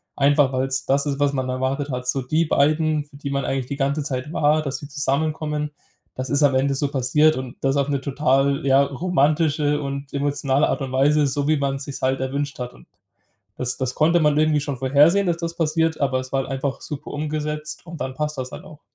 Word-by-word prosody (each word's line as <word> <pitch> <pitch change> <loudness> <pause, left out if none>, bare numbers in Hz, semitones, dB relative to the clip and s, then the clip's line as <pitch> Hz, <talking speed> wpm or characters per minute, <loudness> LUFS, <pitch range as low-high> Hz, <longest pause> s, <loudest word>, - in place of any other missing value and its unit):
Einfach, 140 -1 +3
weil's 135 +1 -1
das 140 +2 +2
ist, 140 -1 -2
was 145 0 +2
man 130 -2 -2
erwartet 130 +3 -1
hat, 125 0 -4
so 135 +2 +1
die 155 +6 +1
beiden, 155 +1 +2
für 145 -1 -16
die 140 -1 -5
man 140 -1 -1
eigentlich 135 -1 -1
die 140 - -5
ganze 140 +2 0
Zeit 135 0 -3
war, 155 -1 +2
dass 140 -3 -3
sie 145 - -9
zusammenkommen, 150 +1 -1 0.4
das 130 0 -5
ist 145 +1 +2
am 140 -2 +5
Ende 135 +1 +2
so 140 +1 0
passiert 145 +4 +3
und 130 -1 -6
das 135 +1 +1
auf 140 0 +1
'ne 140 -2 0
total 140 +1 +1
ja, 135 0 +5
romantische 150 0 +1
und 140 0 -5
emotionale 140 -1 +1
Art - - -1
und 135 -1 -4
Weise, 145 +3 +3
so 140 +1 -1
wie 155 0 +3
man 135 -1 -1
sich's 140 0 -7
halt 130 +1 +1
erwünscht 140 +2 -3
hat. 125 0 -5
Und - - -18 0.7
das 125 0 -2
das 130 -1 -2
konnte 165 +3 +3
man 150 -1 +3
irgendwie 155 -1 +3
schon 140 -3 -4
vorhersehen, 145 +9 +4
dass 170 -1 +1
das 170 0 -4
passiert, 160 0 0
aber 135 -2 +1
es 130 0 -9
war 135 - +2
halt - - -9
einfach 135 0 -3
super 150 -3 -7
umgesetzt 150 0 -4
und 165 -2 -9
dann 130 0 -3
passt 150 +1 -3
das 130 0 -4
halt - - -9
auch. 150 - -13
140 Hz, 225 wpm, -22 LUFS, 135-150 Hz, 0.7 s, am